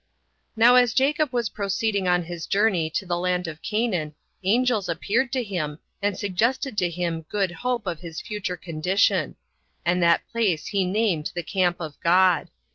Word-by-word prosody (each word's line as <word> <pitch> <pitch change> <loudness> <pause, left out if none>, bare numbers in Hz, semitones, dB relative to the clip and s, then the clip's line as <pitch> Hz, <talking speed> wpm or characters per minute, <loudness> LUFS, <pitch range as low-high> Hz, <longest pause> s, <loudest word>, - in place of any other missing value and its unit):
1. 225 +1 +3
Now 245 - +7
as 245 -2 +4
Jacob 285 +1 +2
was 240 -3 0
proceeding 200 -1 -1
on 180 0 +3
his 170 -1 -7
journey 195 -6 +2
to 180 +4 -3
the 175 -1 -1
land 180 0 0
of 160 0 -7
Canaan, 190 -9 -1 0.3
angels 220 -1 +2
appeared 230 +9 0
to 255 -2 0
him, 165 -8 -3 0.2
and 200 -2 0
suggested 225 +6 0
to 180 - +1
him 170 -1 -2
good 195 -3 0
hope 245 +3 -2
of 175 -4 -3
his 165 -2 -7
future 210 -4 -4
condition; 180 +1 +1 0.5
and 180 +1 +2
that 170 -1 +3
place 205 -9 0
he 195 -2 0
named 185 -5 0
the 175 - -2
Camp 175 0 +1
of 155 -4 -7
God. 180 -1 +3
185 Hz, 175 wpm, -24 LUFS, 175-220 Hz, 0.5 s, Now